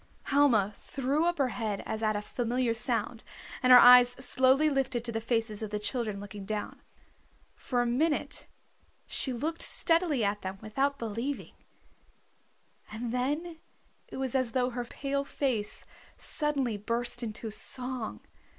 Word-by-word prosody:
Helma 240 Hz, -8 st, +3 dB
threw 280 Hz, +4 st, -1 dB
up 345 Hz, 0 st, 0 dB
her 270 Hz, -3 st, +1 dB
head 215 Hz, -5 st, -3 dB
as 220 Hz, 0 st, -4 dB
at 215 Hz, -1 st, +1 dB
a 205 Hz, -, -3 dB
familiar 245 Hz, +1 st, -1 dB
sound, 235 Hz, 0 st, -1 dB, 0.4 s
and 255 Hz, -, +4 dB
her 250 Hz, -, +12 dB
eyes 245 Hz, 0 st, +9 dB
slowly 260 Hz, +3 st, +3 dB
lifted 265 Hz, -4 st, -1 dB
to 235 Hz, -, -2 dB
the 225 Hz, 0 st, -3 dB
faces 225 Hz, -2 st, -1 dB
of 215 Hz, -, -4 dB
the 210 Hz, -, -2 dB
children 215 Hz, -1 st, -2 dB
looking 205 Hz, 0 st, -8 dB
down. 210 Hz, +1 st, -5 dB, 0.7 s
For 245 Hz, -2 st, -1 dB
a -, -, -2 dB
minute 295 Hz, +6 st, 0 dB, 0.6 s
she 265 Hz, -, 0 dB
looked 305 Hz, +7 st, -3 dB
steadily 330 Hz, -7 st, +2 dB
at 205 Hz, 0 st, -1 dB
them 190 Hz, +1 st, -5 dB
without 270 Hz, +7 st, -1 dB
believing, 230 Hz, +5 st, -4 dB, 1.4 s
and 225 Hz, +2 st, -4 dB
then 295 Hz, +7 st, -2 dB, 0.5 s
it -, -, -9 dB
was 265 Hz, -2 st, -1 dB
as 255 Hz, -4 st, 0 dB
though 255 Hz, -1 st, +1 dB
her 245 Hz, 0 st, -4 dB
pale 280 Hz, +3 st, -3 dB
face 250 Hz, -7 st, -2 dB, 0.3 s
suddenly 275 Hz, -7 st, -1 dB
burst 235 Hz, +4 st, -1 dB
into 220 Hz, -1 st, -5 dB
song. 250 Hz, +1 st, -2 dB
245 Hz, 150 wpm, -29 LUFS, 220-270 Hz, 1.4 s, her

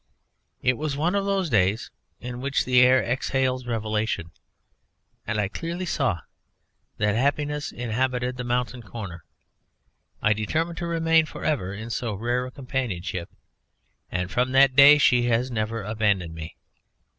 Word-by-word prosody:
It 130 Hz, -1 st, +2 dB
was 150 Hz, -2 st, -2 dB
one 165 Hz, +5 st, +1 dB
of 200 Hz, -1 st, 0 dB
those 195 Hz, -2 st, 0 dB
days 105 Hz, -3 st, +1 dB, 0.3 s
in 125 Hz, 0 st, -6 dB
which 140 Hz, +1 st, 0 dB
the 125 Hz, -1 st, +5 dB
air 130 Hz, +1 st, +5 dB
exhales 130 Hz, 0 st, -1 dB
revelation, 110 Hz, -6 st, -2 dB, 1.0 s
and 110 Hz, 0 st, -1 dB
I 105 Hz, -, +1 dB
clearly 170 Hz, -, -4 dB
saw 130 Hz, -, 0 dB, 0.8 s
that 105 Hz, 0 st, +1 dB
happiness 145 Hz, +5 st, 0 dB
inhabited 125 Hz, +1 st, -1 dB
the 125 Hz, -, -5 dB
mountain 125 Hz, 0 st, -2 dB
corner. 100 Hz, -6 st, -8 dB, 1.0 s
I 110 Hz, -, +3 dB
determined 160 Hz, +11 st, -2 dB
to 170 Hz, -, -3 dB
remain 165 Hz, -1 st, +3 dB
for -, -, -8 dB
ever 115 Hz, -12 st, 0 dB
in 110 Hz, +4 st, -7 dB
so 115 Hz, -2 st, -2 dB
rare 120 Hz, +4 st, -1 dB
a -, -, -9 dB
companionship, 115 Hz, -10 st, -4 dB, 0.8 s
and 90 Hz, 0 st, -2 dB
from 125 Hz, +3 st, 0 dB
that 135 Hz, -1 st, +5 dB
day 145 Hz, +2 st, +9 dB
she 125 Hz, -4 st, +4 dB
has 120 Hz, +2 st, +1 dB
never 110 Hz, -1 st, -2 dB
abandoned 100 Hz, -5 st, 0 dB
me. 80 Hz, 0 st, -8 dB
125 Hz, 145 wpm, -25 LUFS, 110-140 Hz, 1.0 s, day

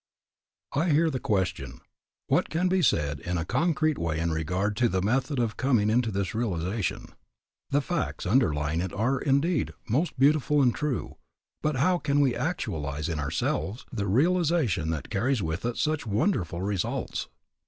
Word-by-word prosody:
I 160 Hz, +6 st, +1 dB
hear 160 Hz, +2 st, +3 dB
the 130 Hz, -, -2 dB
question, 95 Hz, -5 st, -1 dB, 0.5 s
What -, -, +1 dB
can 175 Hz, +3 st, +1 dB
be 185 Hz, 0 st, +2 dB
said 70 Hz, -, +1 dB
in 90 Hz, +4 st, -3 dB
a 80 Hz, -, -2 dB
concrete 155 Hz, -, +1 dB
way 80 Hz, -1 st, -1 dB
in 85 Hz, 0 st, 0 dB
regard 90 Hz, +6 st, -1 dB
to 120 Hz, -1 st, +3 dB
the 95 Hz, -, 0 dB
method 130 Hz, +8 st, 0 dB
of 115 Hz, -4 st, -1 dB
coming 120 Hz, -6 st, +2 dB
into 120 Hz, 0 st, +2 dB
this 100 Hz, -2 st, -2 dB
realization? 100 Hz, -3 st, -2 dB, 0.6 s
The 145 Hz, +1 st, +2 dB
facts 175 Hz, -, -3 dB
underlying 80 Hz, -, +2 dB
it 95 Hz, -1 st, -3 dB
are, 125 Hz, +6 st, +1 dB
indeed, 145 Hz, +4 st, +1 dB
most 140 Hz, +8 st, 0 dB
beautiful 150 Hz, +2 st, +3 dB
and 125 Hz, -4 st, +4 dB
true, 150 Hz, -4 st, -3 dB, 0.4 s
but 150 Hz, -1 st, 0 dB
how 175 Hz, +7 st, +2 dB
can 145 Hz, -2 st, +1 dB
we 135 Hz, -4 st, +3 dB
actualize 75 Hz, 0 st, -2 dB
in 80 Hz, -2 st, -2 dB
ourselves 95 Hz, -, -2 dB
the 105 Hz, -4 st, -2 dB
realization 145 Hz, -, +2 dB
that 80 Hz, -2 st, -4 dB
carries 115 Hz, +2 st, +1 dB
with 80 Hz, +6 st, -3 dB
it 120 Hz, 0 st, -2 dB
such 155 Hz, -5 st, -1 dB
wonderful 100 Hz, -, 0 dB
results? 100 Hz, -3 st, -2 dB
115 Hz, 165 wpm, -27 LUFS, 90-145 Hz, 0.6 s, and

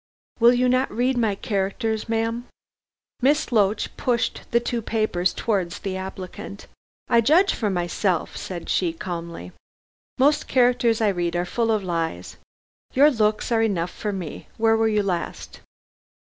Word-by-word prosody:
"Will 235 Hz, +1 st, +7 dB
you 250 Hz, +1 st, +2 dB
not 255 Hz, +1 st, +2 dB
read 250 Hz, +3 st, +1 dB
my 225 Hz, -4 st, +1 dB
characters, 210 Hz, +3 st, -2 dB
ma'am?" 230 Hz, +2 st, -1 dB, 0.7 s
Miss 285 Hz, +2 st, +2 dB
Loach 210 Hz, -2 st, +1 dB
pushed 240 Hz, -2 st, 0 dB
the 235 Hz, -, +3 dB
two 240 Hz, 0 st, -2 dB
papers 215 Hz, -5 st, 0 dB
towards 190 Hz, -6 st, -1 dB
the 195 Hz, -2 st, -4 dB
applicant. 190 Hz, +1 st, -7 dB, 0.4 s
"I 235 Hz, -1 st, +4 dB
judge 330 Hz, -, +4 dB
for 215 Hz, -, -1 dB
myself," 175 Hz, -1 st, -1 dB
said 175 Hz, -3 st, -6 dB
she 175 Hz, -3 st, +1 dB
calmly. 170 Hz, -, -6 dB, 0.7 s
"Most 290 Hz, +3 st, +3 dB
characters 245 Hz, -3 st, +3 dB
I 215 Hz, -, +4 dB
read 175 Hz, -3 st, -1 dB
are 175 Hz, +1 st, 0 dB
full 230 Hz, +4 st, -1 dB
of 215 Hz, -2 st, +1 dB
lies. 165 Hz, -, -3 dB, 0.6 s
Your 290 Hz, +3 st, +6 dB
looks 215 Hz, -1 st, 0 dB
are 225 Hz, -1 st, +3 dB
enough 180 Hz, -6 st, 0 dB
for 210 Hz, -, -4 dB
me. 185 Hz, -6 st, -6 dB
Where 225 Hz, 0 st, +3 dB
were 225 Hz, 0 st, +2 dB
you 210 Hz, -1 st, +1 dB
last?" 180 Hz, -3 st, -4 dB
215 Hz, 150 wpm, -23 LUFS, 185-235 Hz, 0.7 s, Will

